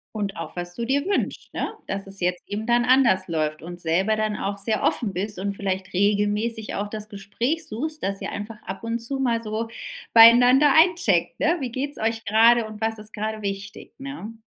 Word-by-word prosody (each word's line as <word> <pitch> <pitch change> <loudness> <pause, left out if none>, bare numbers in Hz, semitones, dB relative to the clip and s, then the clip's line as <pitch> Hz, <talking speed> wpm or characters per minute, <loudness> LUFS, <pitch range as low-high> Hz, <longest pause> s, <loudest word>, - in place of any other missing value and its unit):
Und 200 -2 -3
auch, 165 - -7
was 175 0 -5
du 235 - -3
dir 280 +6 0
wünscht, 400 - -2
ne? - - -2
Dass 195 0 -4
es 195 0 -9
jetzt 180 0 -1
eben 215 +2 -4
dann 240 0 +3
anders 245 -8 +3
läuft. 155 -2 -2
Und 175 +1 -8
selber 185 +6 +1
dann 215 -1 -1
auch 200 0 -3
sehr 215 +2 -1
offen 205 -5 0
bist 200 +1 -3
und 200 +1 -2
vielleicht 190 -1 -3
regelmäßig 210 +3 0
auch 205 +1 -3
das 215 -1 -6
Gespräch 230 +10 -3
suchst, 305 +8 -5
dass 195 0 -2
ihr - - -4
einfach 210 +1 -7
ab 195 +4 -6
und 230 +1 -1
zu 270 +4 -4
mal 235 -3 +1
so 220 +1 -3 0.4
beieinander 245 +5 +8
eincheckt, 320 - +3
ne? 335 +3 +3
Wie 255 -3 -3
geht's 280 +4 -3
euch 225 +1 -1
grade 225 +2 +5
und 215 0 -10
was 220 0 -1
ist 215 +1 -12
grade 215 0 -3
wichtig, 200 0 -6
ne? 270 -5 -7
215 Hz, 205 wpm, -24 LUFS, 195-235 Hz, 0.4 s, beieinander